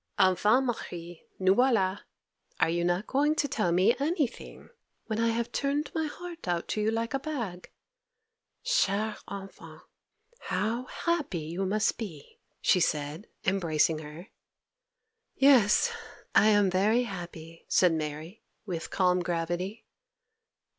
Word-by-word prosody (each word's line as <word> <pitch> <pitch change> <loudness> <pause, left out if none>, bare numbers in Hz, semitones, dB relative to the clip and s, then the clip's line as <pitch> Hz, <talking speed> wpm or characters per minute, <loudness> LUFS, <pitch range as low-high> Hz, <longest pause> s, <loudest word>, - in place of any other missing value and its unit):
'Enfin, 210 +8 +4
Marie, 175 -8 -6
nous 190 0 +4
voilà! 200 -5 +2 0.6
are 160 - +3
you 170 0 0
not 175 +4 0
going 295 +3 +2
to 290 - +1
tell 215 -9 0
me 190 +8 +4
anything, 295 -3 -2 0.4
when 220 -1 -3
I 230 - +2
have 230 +1 -1
turned 285 +2 -1
my 320 -1 -1
heart 345 - -9
out 175 -1 -1
to 215 - -1
you 210 - +2
like 230 +2 -2
a 275 - 0
bag? 235 - -5 1.0
Chère 220 - +1
enfant! 195 -1 -9 0.6
how 230 +4 -2
happy 335 - -2
you 170 +5 -3
must 210 +3 +1
be!' 170 -11 -8 0.2
she 185 - +4
said, 150 +3 -1 0.2
embracing 165 -4 +2
her. 155 +5 -10 1.1
'Yes, 270 - +5 0.4
I 210 - +6
am 205 -3 +4
very 210 +6 +3
happy,' 170 -5 -8
said 180 -3 +4
Mary, 155 +6 -5 0.2
with 170 -5 -4
calm 180 -1 +2
gravity. 175 +4 -3
200 Hz, 130 wpm, -29 LUFS, 175-240 Hz, 1.1 s, I